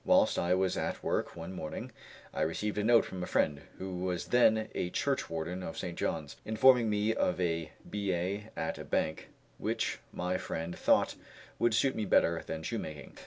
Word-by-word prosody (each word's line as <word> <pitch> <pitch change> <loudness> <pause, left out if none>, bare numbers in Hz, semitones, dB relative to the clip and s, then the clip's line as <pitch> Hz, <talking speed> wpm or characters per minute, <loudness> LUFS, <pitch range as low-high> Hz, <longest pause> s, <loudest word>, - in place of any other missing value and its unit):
Whilst 275 0 +4
I 90 +1 +3
was 95 0 +1
at - - -2
work - - -1
one 85 +2 -6
morning 80 -4 -5 0.4
I - - -2
received 105 +7 -1
a - - +1
note 115 +1 +5
from 95 - -6
a 90 - -3
friend, 70 -1 +1 0.2
who 95 -1 -5
was 90 -1 -2
then 110 -3 +4
a 90 - -1
churchwarden 90 - -1
of 80 - -6
St. 85 -2 -4
John's, 75 -4 -2
informing 120 +1 +5
me 105 +1 +2
of 90 -4 0
a 85 -3 0 0.2
billet 100 0 -1
at 80 - -2
a - - -5
bank, 80 - -1 0.3
which - - -1
my 90 +1 -1
friend 80 +2 -4
thought - - +3 0.5
would 120 -2 +3
suit 130 +4 +3
me 110 - -1
better 85 -3 +3
than 80 0 -4
shoemaking. 75 -1 -5
90 Hz, 180 wpm, -32 LUFS, 85-110 Hz, 0.5 s, note